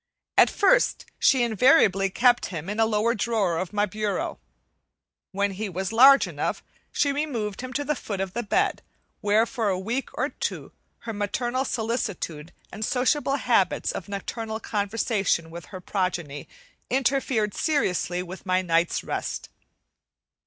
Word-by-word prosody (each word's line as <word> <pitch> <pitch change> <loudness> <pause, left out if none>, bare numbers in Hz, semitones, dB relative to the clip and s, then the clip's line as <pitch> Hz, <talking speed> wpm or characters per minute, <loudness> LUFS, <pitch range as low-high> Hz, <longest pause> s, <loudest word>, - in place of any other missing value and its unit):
At - - +6
first - - +2
she 260 -3 +4
invariably 220 - +4
kept 240 +4 +3
him 175 0 -5
in 210 - -4
a 225 - +4
lower 220 +2 +1
drawer 210 -7 0
of 185 - -4
my 205 0 +1
bureau. 210 - -3 0.9
When 200 +1 0
he 205 +2 -4
was 190 +2 -3
large 270 +4 +7
enough, - - -3 0.3
she 285 - +1
removed 245 -9 -3
him 255 0 -6
to 290 - -1
the 300 - +1
foot 205 -8 -5
of 190 -1 -3
the 240 - -1
bed, 215 - 0 0.4
where 210 +2 +3
for 230 -3 -2
a 185 - 0
week 230 +8 -3
or - - 0
two - - -5 0.3
her 230 -1 -5
maternal 240 +5 -1
solicitude 210 - -3 0.2
and 215 - -6
sociable 265 +4 +1
habits 235 -9 +1
of 185 - -7
nocturnal 220 +2 -4
conversation 205 -5 -1
with 170 0 -8
her 185 - -9
progeny 180 -6 -3 0.4
interfered 260 -5 +1
seriously 180 - 0
with 185 +1 -9
my 185 -1 +1
night's 170 -1 +1
rest. - - -4
210 Hz, 150 wpm, -25 LUFS, 190-245 Hz, 0.9 s, large